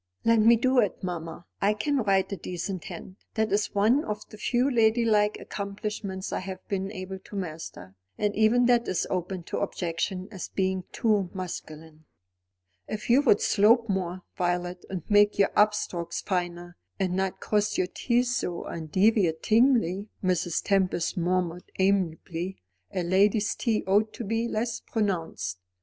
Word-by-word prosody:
"Let 230 0 +5
me 230 +2 +7
do 255 +2 +3
it, 205 -5 0
mamma. 170 -2 -5 0.2
I 205 +2 +3
can 285 +7 0
write 195 -5 +2
a - - -1
decent 180 +1 -5
hand. 185 - -9 0.2
That 220 0 +1
is 205 +1 0
one 225 +9 +4
of 210 0 -5
the 215 - -10
few 245 +3 +1
ladylike 220 -4 +3
accomplishments 200 -1 -5
I - - 0
have 185 0 -8
been 195 0 -2
able 190 -1 -6
to 200 - -12
master; 160 - -6 0.2
and 205 -1 0
even 220 +3 +4
that 240 -1 +3
is 185 - 0
open 185 0 -2
to - - -4
objection 185 +2 -2
as 190 -4 -6
being 190 -1 -1
too 210 -5 +1
masculine." 160 -3 -7 0.8
"If 215 +2 -3
you 260 +4 +6
would 235 -8 +4
slope 225 +3 +4
more, 185 -2 -2
Violet, 175 0 -2
and 185 -4 -4
make 205 0 +4
your 200 -1 +3
up 210 0 +5
strokes 175 -4 -3
finer, 175 -2 -3 0.2
and 185 -2 0
not 190 0 -1
cross 210 0 0
your 185 - +2
T's 245 +6 0
so 175 -6 -2
undeviatingly," 195 - +2 0.2
Mrs. 180 -2 0
Tempest 190 -3 +1
murmured 180 -1 -1
amiably. 190 -1 0 0.3
"A 180 - -1
lady's 200 +4 +3
T 225 -4 0
ought 205 +3 +2
to - - -6
be 225 +2 -1
less 230 +1 -2
pronounced. 170 - -2
195 Hz, 155 wpm, -27 LUFS, 180-215 Hz, 0.8 s, me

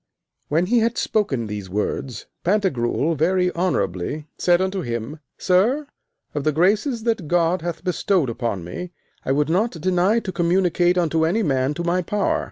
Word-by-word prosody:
When 165 +4 +2
he 235 +5 +3
had 230 +1 0
spoken 140 - 0
these 105 -3 -6
words, 105 +4 -3 0.2
Pantagruel 165 - +1
very 180 +4 +1
honourably 150 - -1
said 175 -1 +3
unto 190 0 -1
him: 120 +3 -4 0.2
Sir, 225 +11 +2 0.5
of 145 - -2
the 155 - +2
graces 210 - +1
that 225 -8 -1
God 175 +1 +2
hath 170 0 -4
bestowed 180 -3 +1
upon 115 -6 -3
me, 175 - -7 0.3
I - - 0
would 145 +1 +2
not 200 +9 +1
deny 185 +5 +2
to 190 - -4
communicate 175 0 +2
unto 165 -2 +1
any 190 +8 +1
man 135 -2 0
to 170 - -3
my 175 +1 +1
power. 200 +3 0
175 Hz, 165 wpm, -22 LUFS, 145-190 Hz, 0.5 s, he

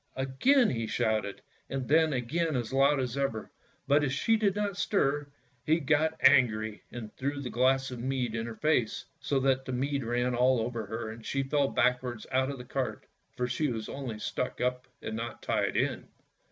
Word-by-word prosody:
" - - -40
Again 175 - +3
he 115 -3 -2
shouted, 110 -2 -1 0.3
and 135 -2 -3
then 160 +1 +4
again 150 +5 -1
as 120 -1 -2
loud 140 +1 +4
as 125 -1 -2
ever, 135 -6 -2 0.4
but 145 +2 +4
as 140 - 0
she 225 +11 +2
did 205 -3 +1
not 205 -2 -1
stir, 145 -8 +1 0.4
he 160 +5 +3
got 155 +2 +1
angry 110 -6 +4
and 110 -3 -8
threw 140 +2 -2
the 130 -3 -5
glass 130 +1 +2
of 125 - -6
mead 125 -2 -1
in 115 0 -2
her 115 - -6
face, 125 -5 +1
so 140 - 0
that 130 0 +2
the - - -4
mead 135 +2 -1
ran 120 +2 0
all 125 +1 +3
over 115 -1 -3
her, 110 +1 -4
and 115 +1 -10
she 135 +3 -1
fell 140 +1 +1
backwards 125 -3 0
out 130 +1 +2
of 140 - -4
the 125 - -9
cart, 130 0 -3 0.3
for 125 - 0
she 135 +5 0
was 110 -2 -4
only 130 -6 -5
stuck 125 +4 -3
up 125 +1 -1 0.2
and 110 - -4
not 115 0 -5
tied - - 0
in. - - -1
130 Hz, 200 wpm, -29 LUFS, 120-140 Hz, 0.4 s, then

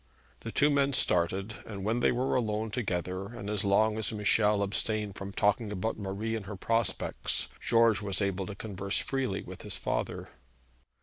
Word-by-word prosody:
The 115 - -6
two 145 +5 +4
men 140 -1 +2
started, 95 +1 +1
and 100 -3 -6
when 110 +4 +1
they - - +4
were 125 +2 0
alone 110 -2 0
together, 95 -5 -2
and 105 -2 -6
as 105 0 -1
long 105 +2 +3
as 105 - 0
Michel 105 -1 +3
abstained 105 0 -1
from 100 0 -6
talking 105 +2 +1
about 105 +3 -2
Marie 100 +3 -2
and 105 -4 -5
her 105 - -5
prospects, 115 +4 0
George 115 -2 +4
was 100 -2 -1
able 100 -2 -1
to 100 - -6
converse 100 -2 -1
freely 130 -8 -1
with - - -9
his - - -2
father. - - -2
105 Hz, 175 wpm, -30 LUFS, 100-115 Hz, -, two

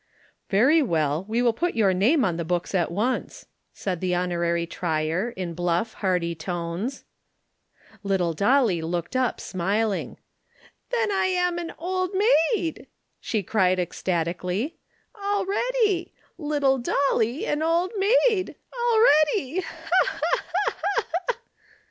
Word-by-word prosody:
"Very 265 +11 +4
well, 160 - 0
we 230 +3 0
will 235 -2 +3
put 345 +9 -1
your 205 -4 +3
name 235 - +3
on 175 -4 0
the 170 - -2
books 175 +3 -2
at 180 -3 +1
once," 220 +8 -2 0.3
said 185 -4 -4
the 180 -1 0
Honorary 170 -1 0
Trier, 165 +4 -1
in 180 -3 -4
bluff, 175 +5 -1
hearty 180 -4 0
tones. 175 - -4 1.0
Little 190 -4 0
Dolly 205 - +3
looked 170 +6 -3
up 255 -1 +1
smiling. 200 +3 -1 0.7
"Then 465 -3 +1
I'm 360 -3 +1
an 340 -1 -6
old 370 +2 -2 0.4
maid!" 335 -6 -4 0.3
she 215 -3 -2
cried 185 -2 +2
ecstatically. 180 - -2 0.5
"Already! 405 0 0 0.2
Little 290 -4 +1
Dolly 245 0 +1
an 295 +1 -1
old 335 +3 +1
maid! 415 0 +2 0.2
Already! 405 - +3
Ha! - - -8 0.2
ha! - - +3
ha! - - -1 0.2
ha! 405 0 -1 0.2
ha!" - - 0
225 Hz, 125 wpm, -25 LUFS, -, 1.0 s, Very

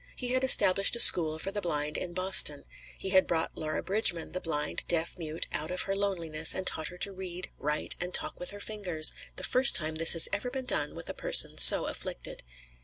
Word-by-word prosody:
He 250 - -6
had 255 +1 -2
established 195 -6 +4
a - - -6
school 160 -7 +4
for 190 +5 -7
the 205 - -7
blind 150 -4 -5
in 175 -1 -7
Boston; 185 -6 +3 0.3
he 190 - -6
had 190 -1 +1
brought 165 -1 -5
Laura 155 0 -7
Bridgman, 190 -5 -1
the 185 - -7
blind, 150 -2 -5
deaf 170 -1 -3
mute, 160 -2 -7
out 155 +1 -6
of 180 - -6
her 195 - -6
loneliness 170 -6 -2
and 190 - -6
taught 160 -3 -1
her 180 - -11
to 200 - -3
read, 185 -1 -11
write, 150 +1 -4
and 180 0 -7
talk - - -4
with 180 - -7
her 205 - -8
fingers; 190 -7 0 0.2
the - - -8
first 260 +2 +3
time 155 -2 -1
this 165 +1 +2
had 165 - +4
ever 205 +5 -5
been 260 0 -8
done 150 -10 -2
with - - -12
a - - -7
person - - +1
so - - +10
afflicted. - - -9
180 Hz, 220 wpm, -26 LUFS, 160-195 Hz, 0.3 s, so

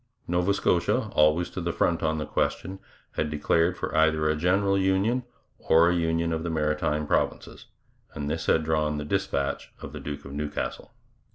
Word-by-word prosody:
Nova 90 +3 +1
Scotia, 90 -3 +1
always 75 +3 +3
to 95 - -5
the 85 0 -1
front 85 0 +1
on 80 -1 0
the 75 - -3
question, 95 +6 -2 0.3
had 75 - -2
declared 80 +4 +1
for - - -4
either 80 -1 +3
a 75 - +2
general 95 +5 +2
union 95 +6 +2 0.4
or 85 +2 +4
a - - +1
union 85 0 0
of 80 - -2
the 85 - -3
Maritime 75 -1 0
Provinces, - - -2 0.5
and 70 - -4
this 80 +2 -3
had 80 - +3
drawn 75 -1 0
the 75 - -4
dispatch 75 -6 -2
of - - -9
the - - -6
Duke 75 -1 -6
of 70 - -8
Newcastle. 75 +1 -4
80 Hz, 180 wpm, -26 LUFS, 75-90 Hz, 0.5 s, or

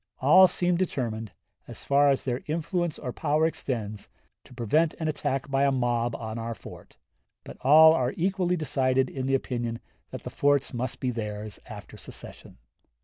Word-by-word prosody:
All 185 +8 +7
seemed 175 -1 0
determined, 115 - -2 0.4
as - - -8
far 140 +1 +4
as 135 - +1
their 125 -1 -2
influence 170 +1 -2
or 125 - -5
power 155 0 +1
extends, 115 -10 -4 0.4
to - - -15
prevent 150 +7 +1
an 160 - -3
attack 135 -2 -2
by 135 0 +2
a 140 - +3
mob 120 -2 0
on 110 0 -5
our 115 0 -4
fort; - - -13 0.5
but - - -11
all 160 +4 +8
are 130 -5 0
equally 180 0 0
decided 130 -4 +1
in 130 -1 -4
the 135 - +2
opinion 120 -3 -3 0.3
that - - -8
the - - -6
forts 145 -1 +1
must 125 +1 -3
be 130 - -1
theirs 105 -2 -5
after - - -10
secession." - - -10
135 Hz, 170 wpm, -27 LUFS, 120-155 Hz, 0.5 s, all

